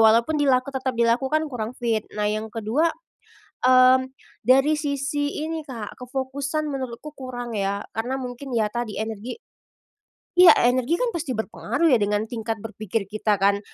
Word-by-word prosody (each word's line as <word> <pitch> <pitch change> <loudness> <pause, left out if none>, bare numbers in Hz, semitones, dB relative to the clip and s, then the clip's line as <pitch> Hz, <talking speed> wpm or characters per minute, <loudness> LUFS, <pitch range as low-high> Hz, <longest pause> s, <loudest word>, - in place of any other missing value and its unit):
walaupun 230 +7 +5
dila 265 -3 +4
tetap 265 -1 -3
dilakukan, 255 +7 +2
kurang 225 -1 -3
fit. 230 -3 0 0.2
Nah, 210 - 0
yang 215 +1 -1
kedua, 225 +9 0 0.8
mmm, 255 0 +6 0.4
dari 270 +4 +5
sisi 290 0 -2
ini 315 -1 -4
Kak, 230 -5 -7
kefokusan 275 +4 -3
menurutku 265 +2 -5
kurang 250 -4 -6
ya, 200 +1 -1
karena 240 +4 -2
mungkin 255 0 -5
ya 220 -2 +3
tadi 240 -3 -3
energi 220 +2 -4 1.2
energi 250 +5 +2
kan - - 0
pasti 290 -7 -3
berpengaruh 245 +7 0
ya 240 - +5
dengan 205 +1 +1
tingkat 225 0 -4
berpikir 215 -1 -3
kita 215 -1 +1
kan. 200 +1 +2
250 Hz, 145 wpm, -24 LUFS, 220-275 Hz, 1.2 s, mmm